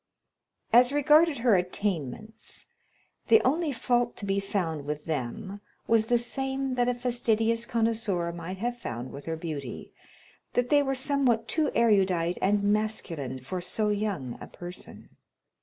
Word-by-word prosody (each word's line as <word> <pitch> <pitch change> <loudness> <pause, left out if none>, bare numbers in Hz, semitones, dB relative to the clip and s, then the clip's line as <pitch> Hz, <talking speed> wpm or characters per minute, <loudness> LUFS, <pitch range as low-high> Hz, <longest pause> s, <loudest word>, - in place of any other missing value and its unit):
As 245 +2 +7
regarded 300 +2 +4
her 235 -3 +4
attainments, 185 - -3 0.6
the 445 - +7
only 310 +3 +2
fault 240 -1 0
to 205 - -5
be 195 0 +1
found 175 -6 -2
with 150 +1 -4
them 165 - -4 0.2
was 225 -1 +3
the 240 - +4
same 265 +2 -2
that 245 -1 +1
a 245 - 0
fastidious 230 -2 0
connoisseur 220 -7 0
might 170 +2 -6
have 240 +4 -2
found 120 - -5
with 140 - -9
her 165 - -2
beauty, 150 -7 -6 0.6
that 245 0 +1
they 290 -1 +5
were 270 -1 0
somewhat 255 -4 +1
too 310 -3 +1
erudite 190 -6 +3
and 200 +1 +2
masculine 205 - -1
for 180 +8 -4
so 210 +4 0
young 200 - -2
a - - -7
person. 175 +1 -9
215 Hz, 145 wpm, -28 LUFS, 175-245 Hz, 0.6 s, As